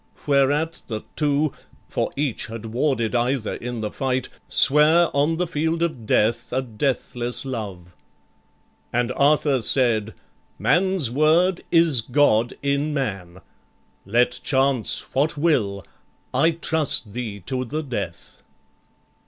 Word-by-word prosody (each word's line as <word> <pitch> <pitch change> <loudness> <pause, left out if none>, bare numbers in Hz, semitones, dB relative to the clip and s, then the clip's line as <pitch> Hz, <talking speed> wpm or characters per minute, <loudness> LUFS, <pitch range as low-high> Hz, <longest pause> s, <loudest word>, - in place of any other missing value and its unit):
Whereat 145 +3 +1
the 110 -2 -5
two, 150 0 +1 0.3
For - - -2
each 140 -6 -2
had 115 0 -8
warded 115 -1 -1
either 120 -1 0
in 120 -1 -5
the 105 - -3
fight, 130 -1 -2 0.2
Sware 155 +5 +4
on 150 +3 +2
the 180 - 0
field 160 +1 -1
of 125 -10 -3
death 115 +2 +1
a 130 +1 0
deathless 120 +1 -2
love. 100 -9 -6 1.0
And 120 +1 0
Arthur 140 -1 +2
said, 110 -3 +1 0.4
"Man's 170 - +2
word 165 +6 +3
is 165 -7 +4
God 120 -2 +2
in 140 +2 0
man: 95 -9 -4 0.6
Let 120 +5 +1
chance 135 -4 +1
what 145 +3 +1
will, 105 - 0 0.5
I 165 - +4
trust 160 -9 -1
thee 110 -4 -5
to 130 +7 -2
the 150 +6 -4
death." 130 -5 -6
130 Hz, 120 wpm, -23 LUFS, 115-150 Hz, 1.0 s, Sware